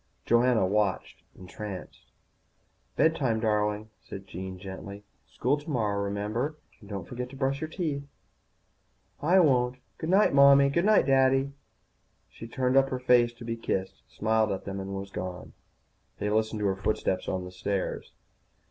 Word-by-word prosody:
Joanna 120 -3 +3
watched 100 0 -1 0.2
entranced. 95 +1 -9 0.8
"Bed 160 0 +3
time, 120 -7 0
darling," 105 -1 0
said 95 0 -9
Jean 95 +1 -7
gently. 100 +2 -8 0.3
"School 140 +5 0
tomorrow, 115 -10 -1
remember? 105 +9 -2 0.2
And 100 - -15
don't 100 -4 -5
forget 125 0 -5
to 135 - -11
brush 135 0 -1
your 155 - -2
teeth." 155 -5 -2 1.2
"I 175 +6 +4
won't. 125 -5 +3 0.2
Goodnight, 190 +4 +3
Mommy, 140 0 +7
goodnight, 190 +3 +4
Daddy." 135 0 +3 0.8
She 115 - -10
turned 130 +2 +1
up 135 0 +4
her 130 - -2
face 125 -2 +4
to 120 0 -11
be 115 0 -2
kissed, 95 -4 -3
smiled 110 -1 +1
at 95 - -4
them, 100 0 -4
and 95 0 -5
was 95 0 -6
gone. 90 -1 -6 0.6
They 105 - -2
listened 110 0 0
to - - 0
her 95 -1 +1
footsteps 95 -1 -1
on 95 -1 -2
the 90 - -9
stairs. 95 +1 -3
110 Hz, 150 wpm, -28 LUFS, 100-135 Hz, 1.2 s, Mommy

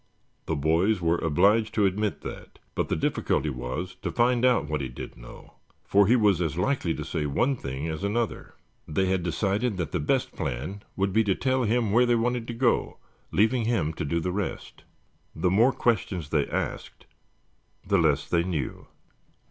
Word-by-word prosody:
The 80 - 0
boys 85 +8 +2
were 85 0 +1
obliged 100 +8 +2
to 105 - +3
admit 100 +2 -1
that, - - -9 0.2
but - - -2
the - - +1
difficulty 75 - 0
was 65 +9 -5
to - - -2
find 120 0 +2
out 125 -11 +3
what 75 -1 -2
he 65 - -3
did - - -8
know, - - -14 0.3
for 100 0 +4
he 120 - +5
was 105 -6 +3
as 80 -2 -1
likely 90 -4 0
to 75 - -5
say 80 -1 -2
one 125 - +1
thing 70 - -5
as 80 +2 -4
another. 110 +3 -2 0.3
They 85 +5 0
had 95 -1 +1
decided 100 +6 -1
that 85 - -3
the 90 - -1
best 75 - 0
plan 75 +12 -4
would 95 0 0
be 110 +2 +4
to 95 -2 +2
tell 130 -1 +1
him 115 -1 +1
where 120 +3 +4
they 120 - +4
wanted 120 0 0
to 120 - -4
go, 120 0 +1 0.3
leaving 110 +3 +2
him 95 -10 0
to - - -4
do 85 +3 0
the 90 +2 -2
rest. 100 +1 -5 0.5
The 90 +3 +1
more 115 +7 +5
questions 95 - -1
they 75 -3 +1
asked - - -4 0.8
the 100 0 +2
less 75 -3 +2
they 85 - +2
knew. 85 -7 -4
95 Hz, 190 wpm, -26 LUFS, 80-115 Hz, 0.8 s, he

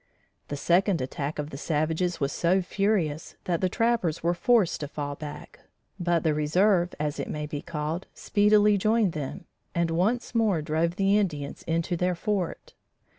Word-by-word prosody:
The 145 - -4
second 175 +4 +2
attack 140 +3 -3
of 150 +1 -4
the 135 - -7
savages 160 +3 0
was 140 0 0
so 180 +2 +2
furious 180 -6 -1
that 170 -2 -1
the 185 - +2
trappers 225 -8 0
were 170 +1 +2
forced 210 -1 +2
to 145 - -4
fall 145 0 -4
back, 145 +1 -9 0.4
but 175 -2 +1
the 160 -2 +2
reserve, 175 +4 +2
as 150 0 -2
it - - -3
may 150 0 -3
be 145 -1 -5
called, 160 +2 -4
speedily 210 0 +4
joined 215 -1 +2
them, 145 -3 -5 0.3
and 170 -1 +1
once 210 +10 0
more 220 -7 +2
drove 160 +3 0
the 200 +1 +3
Indians 150 -8 -3
into 165 +2 0
their 180 +1 0
fort. 190 0 -3
170 Hz, 170 wpm, -27 LUFS, 150-195 Hz, 0.4 s, speedily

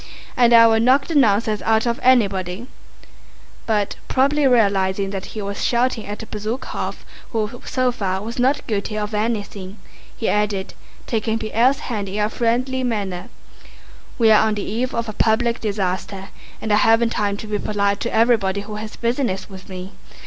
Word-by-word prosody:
And 240 -1 +4
I 230 -1 +8
will 225 -1 +4
knock 260 +4 +4
the 335 - -4
nonsense 215 -5 +3
out 220 +1 +2
of 235 0 -1
anybody"—but 210 -1 -2
probably 280 +2 +2
realizing 195 -5 +2
that 195 -1 -4
he 210 - -3
was 200 0 -4
shouting 240 -3 0
at 205 +1 -5
Bezúkhov 220 +5 -4 0.3
who 225 +1 -3
so 255 -1 +1
far 195 -5 -2
was 230 +3 -6
not 265 +4 +2
guilty 210 0 -2
of 210 +1 -3
anything, 210 -3 -3 0.4
he 225 - -2
added, 210 -2 0 0.3
taking 225 -1 -1
Pierre's 230 +5 +1
hand 210 -5 -4
in 200 +2 -3
a 210 0 +1
friendly 255 +3 0
manner, 205 -4 -3 0.9
"We 225 -3 +5
are 215 0 +5
on 215 - 0
the 205 - -3
eve 245 +5 -2
of 230 0 -2
a 215 - -5
public 230 +2 +1
disaster 195 -1 -3 0.3
and 220 -1 -1
I - - +5
haven't 225 +2 +4
time 205 -2 -1
to 220 - -7
be 210 -1 -2
polite 200 -1 0
to - - -3
everybody 220 -4 +2
who 210 +1 -7
has 215 +1 -7
business 235 -5 -2
with 190 0 -11
me. 185 0 -7
220 Hz, 170 wpm, -21 LUFS, 200-235 Hz, 0.9 s, I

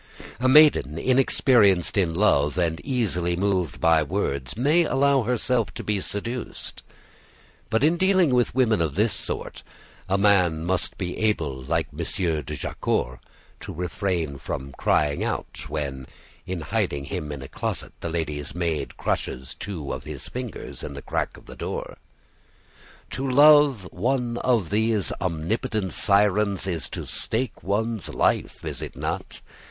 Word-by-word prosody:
A 130 +1 +2
maiden 135 - +6
inexperienced 120 - +3
in 90 -5 +1
love 75 -6 +3
and 85 -2 0
easily 90 -10 0
moved 90 -6 0
by 80 -1 +4
words 70 - -2
may 150 +8 +4
allow 140 -2 +3
herself 120 -3 0
to - - -5
be 105 -2 0
seduced; 115 +6 -5 0.9
but 110 +3 +1
in 160 +3 +4
dealing 185 -6 +3
with 125 -1 +2
women 115 -7 +3
of 80 -4 -1
this 105 +3 +2
sort, - - -4 0.5
a 95 - +3
man 90 -5 +3
must 95 +1 0
be 90 -2 -3
able, 80 -12 0
like 80 +2 0
M. 75 - -11 0.4
de 70 - -6
Jaucourt, 60 +1 -2 0.4
to - - -7
refrain 90 -4 -2
from 70 +1 -5
crying 70 +2 +1
out - - -4
when, 70 -4 -4 0.4
in 90 -2 -3
hiding 70 -1 -1
him 75 +1 -4
in 70 -2 -6
a - - -8
closet, - - -4
the 85 - -4
lady's 75 -3 -3
maid 85 -3 -2
crushes 65 0 -3
two 85 -9 -5
of 65 0 -6
his 75 -2 -7
fingers 125 -4 -6
in - - -6
the - - -8
crack - - -2
of - - -17
a - - -10
door. - - -5 1.1
To 135 +1 -2
love 145 -6 +6
one 120 +3 0
of 115 -9 +1
these 110 -1 +1
omnipotent 95 +5 -1
sirens 100 -1 +3
is 85 -4 -3
to - - -5
stake 115 +1 -2
one's 110 +2 -1
life, - - 0
is - - -5
it - - -6
not? - - -4
95 Hz, 150 wpm, -25 LUFS, 80-120 Hz, 1.1 s, maiden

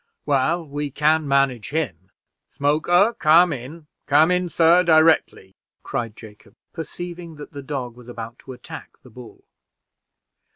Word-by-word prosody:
Well, 150 +4 +1
we 145 +1 -4
can 150 +2 +1
manage 135 -5 +1
him. 105 - -4 0.4
Smoker, 175 +9 +2
come 165 +2 +5
in. 145 +5 -9 0.2
Come 155 +4 +4
in, 180 0 0
sir, 170 +2 +4
directly," 160 - +3 0.3
cried 115 -3 -4
Jacob, 105 -2 -15 0.2
perceiving 170 +1 -8
that 150 -1 -11
the 145 - -8
dog 130 -4 -5
was 125 -1 -15
about 115 0 -8
to 130 - -10
attack 125 - -11
the - - -16
bull. 120 0 -14
145 Hz, 135 wpm, -22 LUFS, 125-165 Hz, 0.4 s, come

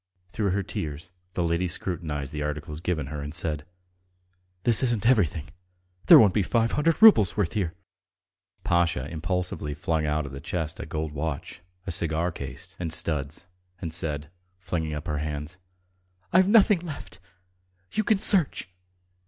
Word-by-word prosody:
Through 100 +3 -1
her 100 +2 0
tears 80 0 -5 0.2
the 90 - 0
lady 85 +2 +1
scrutinized 80 -5 -4
the 75 - -3
articles 75 +1 -4
given 85 -5 -1
her 75 +2 -6
and 75 +2 -6
said: 75 -2 -2 1.0
"This 120 -2 +3
isn't 120 -5 0
everything.... 85 - +2 0.6
There - - +11
won't 100 -5 +6
be 105 - +2
five 115 +4 +1
hundred 160 +2 +1
roubles' 110 - +7
worth 100 -5 0
here." 90 -6 -1 0.9
Pasha 85 -6 +1
impulsively 85 -2 -3
flung 80 0 -1
out 75 0 0
of 70 - -7
the 70 +1 -8
chest 80 -2 -4
a - - -6
gold 80 0 -3
watch, 75 +2 -4 0.2
a 95 - -3
cigar 85 +1 +1
case 70 -4 -8
and 85 -3 -3
studs, 75 0 -1 0.3
and 80 -2 -5
said, 75 -2 -2 0.3
flinging 85 -3 -3
up 75 +2 -6
her 75 -3 -2
hands: 75 +2 -5 0.8
"I've 185 +1 +6
nothing 205 -3 +6
else 175 - -9
left.... - - -12 0.7
You 215 - 0
can 215 0 +3
search!" 190 - +3
85 Hz, 160 wpm, -26 LUFS, 75-95 Hz, 1.0 s, There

